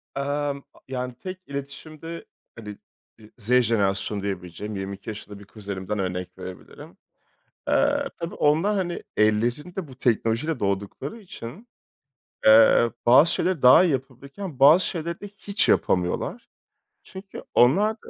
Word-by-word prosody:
Emm, 140 0 -2 0.3
yani 125 -1 -4
tek 185 +7 -7
iletişimde 150 +4 -8 0.3
hani, 105 -2 -8 0.4
eee, 110 -1 -17
Z 120 +2 -1
jenerasyonu 100 -2 0
diyebileceğim 100 +1 -5
22 100 +2 -6
yaşında 105 -1 -8
bir 100 - -13
kuzenimden 100 0 -5
örnek 90 -1 -4
verebilirim. 95 -1 -11 0.7
Eee, - - +2
tabii, 170 +4 -6
onlar, 160 +8 +2
hani, 175 -3 -2
ellerinde 120 - 0
bu 130 - -13
teknolojiyle 120 +5 0
doğdukları 100 - -3
için, 190 - -10 0.8
eee, 115 +1 +7 0.2
bazı 140 +8 +6
şeyleri 185 -6 -1
daha 125 +8 +8
iyi 170 - +2
yapabilirken, 135 +5 -6
bazı 155 +7 +7
şeyleri 170 0 -4
de 205 - -7
hiç 205 0 -2
yapamıyorlar. 90 -1 0 0.6
Çünkü, 190 +1 -10
onlar 190 - +4
da 220 - -16
130 Hz, 125 wpm, -24 LUFS, 105-165 Hz, 0.8 s, daha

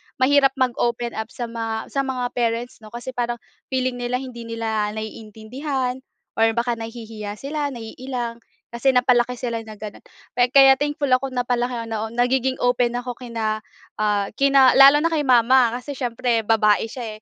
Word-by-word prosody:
mahirap 270 +1 +3
mag-open 240 -1 0
up 220 0 -5
sa 245 +1 -7
mga 225 -1 -5
sa 275 - 0
mga 255 -1 -2
parents 235 0 -2
'no. 215 - -13
Kasi 240 +3 -7
parang 240 -1 -2 0.3
feeling 255 -1 -1
nila 245 +1 -2
hindi 250 -3 -6
nila 220 -2 -2
naiintindihan, 245 +5 -4 0.4
or 225 0 +5
baka 240 0 0
nahihiya 225 -2 -7
sila, 290 +4 -3
naiilang. 240 0 -6 0.3
Kasi 235 +3 +1
napalaki 250 -1 +3
sila 235 -2 -3
na 215 -1 -11
ganoon, 210 -1 -9 0.5
kaya 270 0 +8
thankful 290 +1 -2
ako 260 +1 +2
napalaki 245 -1 -1
ako 230 - -4
na 220 -1 -3
nagiging 250 +2 0
open 245 -1 +1
ako 245 0 -4
kina 225 -3 -3 0.4
ah, 205 -1 0
kina 275 0 +5
lalo 275 +2 +8
na 330 +2 +1
kay 310 - +1
mama. 255 -2 +5
Kasi 265 +3 -7
siyempre 240 -2 -1
babae 215 0 +2
siya, 220 -3 -7
240 Hz, 160 wpm, -22 LUFS, 225-260 Hz, 0.5 s, kaya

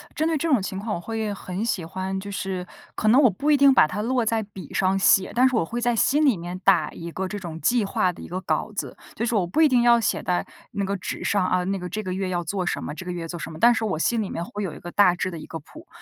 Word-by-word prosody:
针 315 - +1
对 325 -2 +1
这 335 - -1
种 255 -8 +3
情 190 0 -4
况， 210 +2 -3
我 - - -3
会 220 +2 -3
很 190 0 -5
喜 200 -7 -1
欢， 190 +3 -4
就 200 +1 -7
是 190 -2 -4 0.3
可 215 - -2
能 245 +6 +6
我 255 - +6
不 285 +11 -2
一 295 - +6
定 280 -1 +6
把 155 - +6
它 200 +6 -4
落 245 +1 0
在 220 0 0
笔 190 -6 -11
上 195 0 +2
写。 190 0 +4
但 250 +2 +5
是 260 - 0
我 220 - +2
会 235 +9 -4
在 240 0 +1
心 290 +7 +3
里 265 -7 +4
面 175 +1 -6
打 195 -3 +4
一 170 - -8
个 190 - -3
这 205 - -5
种 165 -4 -7
计 240 -4 +2
划 185 -2 +1
的 - - -13
一 - - -8
个 185 +2 -4
稿 - - -1
子， - - -4 0.2
就 230 - -2
是 240 - -1
我 195 -5 +1
不 255 - +1
一 310 - +6
定 245 -2 +3
要 240 0 +6
写 220 - 0
在 180 -1 -1 0.3
那 200 - -2
个 200 +1 -2
纸 - - -5
上 200 -2 +1
啊， 185 0 +1
那 195 0 -1
个 180 - -5
这 215 +5 -4
个 185 - -4
月 190 +1 -2
要 175 -1 -2
做 185 +2 -2
什 - - -2
么 150 - -5
这 185 +3 -8
个 180 - -4
月 170 -1 -5
做 175 - -5
什 - - -5
么。 155 - -9
但 240 +5 +6
是 225 -1 -1
我 190 -6 -1
心 225 +8 +1
里 205 - -3
面 170 - -4
会 205 +4 -6
有 180 -6 -3
一 - - -10
个 175 - -8
大 190 -3 +4
致 185 +1 -2
的 165 - -7
一 - - -9
个 165 - -6
谱， 315 - -15
195 Hz, 340 characters per minute, -24 LUFS, 180-235 Hz, 0.3 s, 能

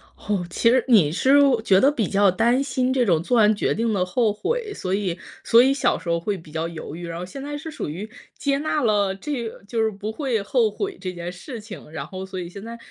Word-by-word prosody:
哦， 200 -4 -2
其 230 - +2
实 255 +1 +4
你 200 - +5
是 270 - +4 0.2
觉 190 -4 +5
得 275 +7 +5
比 225 - -1
较 200 0 +4
担 240 +8 +2
心 260 -1 0
这 255 -2 +2
种 170 -6 +3
做 245 +7 +1
完 215 -1 +5
决 - - 0
定 225 0 0
的 185 -3 +1
后 215 +4 +1
悔， 445 - -2
所 185 - -3
以 190 -3 -1 0.3
所 230 0 +6
以 270 - +4
小 275 - +1
时 185 - -12
候 170 - +1
会 200 +4 -2
比 165 -3 -14
较 160 +1 -2
犹 160 -2 -7
豫， 175 0 -7
然 170 0 -5
后 180 - -5
现 270 +10 -8
在 290 +1 -4
是 315 +2 -7
属 305 - -5
于 195 +8 -6 0.3
接 280 -1 0
纳 305 0 0
了 205 -4 +2
这 235 +1 -4 0.2
就 230 +1 -1
是 220 - +1
不 205 +2 -5
会 245 -5 -1
后 225 +1 +2
悔 390 - -4
这 185 -2 -4
件 175 0 -5
事 225 +8 -8
情， 210 -7 -11
然 150 -3 -5
后 190 0 -6
所 190 -1 -6
以 175 - -5
现 200 +3 -10
在 230 +1 -7
210 Hz, 275 characters per minute, -23 LUFS, 185-255 Hz, 0.3 s, 所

